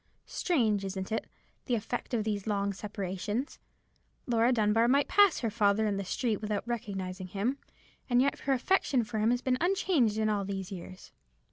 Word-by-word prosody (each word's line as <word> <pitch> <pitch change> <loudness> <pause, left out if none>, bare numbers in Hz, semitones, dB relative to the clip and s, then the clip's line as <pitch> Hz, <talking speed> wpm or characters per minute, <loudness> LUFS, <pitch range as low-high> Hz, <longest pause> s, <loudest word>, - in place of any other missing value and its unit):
Strange, 225 - +1
isn't 190 +1 -4
it, 225 - -2 0.4
the 245 - +1
effect 230 +2 -4
of 220 - 0
these 210 -1 -3
long 200 -1 0
separations? 205 - -4 0.7
Laura 235 0 +3
Dunbar 225 0 +3
might 280 +3 +3
pass 405 -4 +4
her 230 -3 -1
father 210 0 +2
in 205 -2 0
the 200 - -2
street 215 +3 -1
without 210 +1 -3
recognizing 190 -5 -4
him, 215 +9 -2 0.5
and 245 0 +4
yet 275 +2 +2
her 275 - 0
affection 265 -2 +2
for 215 0 -4
him 215 +2 +3
has 245 0 +1
been 255 -1 +1
unchanged 340 - +2
in 220 0 +1
all 205 -2 0
these 195 -1 -5
years." 185 0 -9
220 Hz, 175 wpm, -30 LUFS, 200-245 Hz, 0.7 s, pass